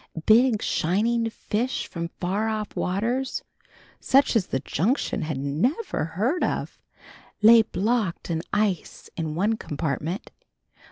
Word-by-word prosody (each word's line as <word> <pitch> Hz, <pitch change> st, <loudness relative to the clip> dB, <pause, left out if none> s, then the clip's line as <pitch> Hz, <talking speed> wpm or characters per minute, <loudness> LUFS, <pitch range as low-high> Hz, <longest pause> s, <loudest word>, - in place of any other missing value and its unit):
Big 225 Hz, 0 st, +5 dB
shining 225 Hz, +7 st, +1 dB
fish 230 Hz, +3 st, -2 dB
from 170 Hz, -1 st, -4 dB
far 200 Hz, +5 st, 0 dB
off 215 Hz, -1 st, -4 dB
waters, 235 Hz, +8 st, -1 dB, 0.6 s
such 270 Hz, -1 st, +3 dB
as 205 Hz, -5 st, +2 dB
the 135 Hz, -, -1 dB
Junction 215 Hz, -, 0 dB
had 155 Hz, -3 st, -3 dB
never 160 Hz, -, -1 dB
heard 250 Hz, -, +1 dB
of, -, -, -2 dB, 0.6 s
lay 230 Hz, +1 st, +9 dB
blocked 215 Hz, -4 st, -1 dB
in 160 Hz, -1 st, -1 dB
ice 205 Hz, -5 st, -1 dB
in 160 Hz, -2 st, -3 dB
one 210 Hz, +6 st, +1 dB
compartment. 155 Hz, -, -3 dB
210 Hz, 120 wpm, -25 LUFS, 170-235 Hz, 0.6 s, lay